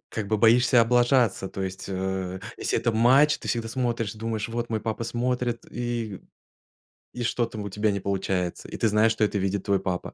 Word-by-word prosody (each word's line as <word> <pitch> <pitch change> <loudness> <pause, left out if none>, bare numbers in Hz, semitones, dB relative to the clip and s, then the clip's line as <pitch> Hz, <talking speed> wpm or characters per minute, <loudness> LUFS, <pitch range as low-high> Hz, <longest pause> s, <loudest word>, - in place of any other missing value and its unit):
как 110 -2 -4
бы 110 +2 +1
боишься 120 +3 +5
облажаться. 120 -4 +3
То 95 - -5
есть, 95 0 -5
э, 95 -1 -3 0.2
если - - -1
это 120 - +1
матч, 130 +7 +4
ты - - -10
всегда 115 -1 -1
смотришь, 115 -3 -2
думаешь: 110 -1 -3
"Вот 120 +1 -3
мой 110 -1 -1
папа 110 +1 -3
смотрит". 120 0 -1
И 120 -5 -4 0.9
и 125 - -4
что-то 115 -1 -1
у 100 -1 -4
тебя 105 +2 0
не 100 - -2
получается, 95 -2 -2
и - - -8
ты 115 - +2
знаешь, 105 +2 +4
что 110 -1 0
это 105 -1 +1
видит 95 0 -1
твой 100 -1 +2
папа. 90 -1 -4
110 Hz, 195 wpm, -26 LUFS, 100-120 Hz, 0.9 s, боишься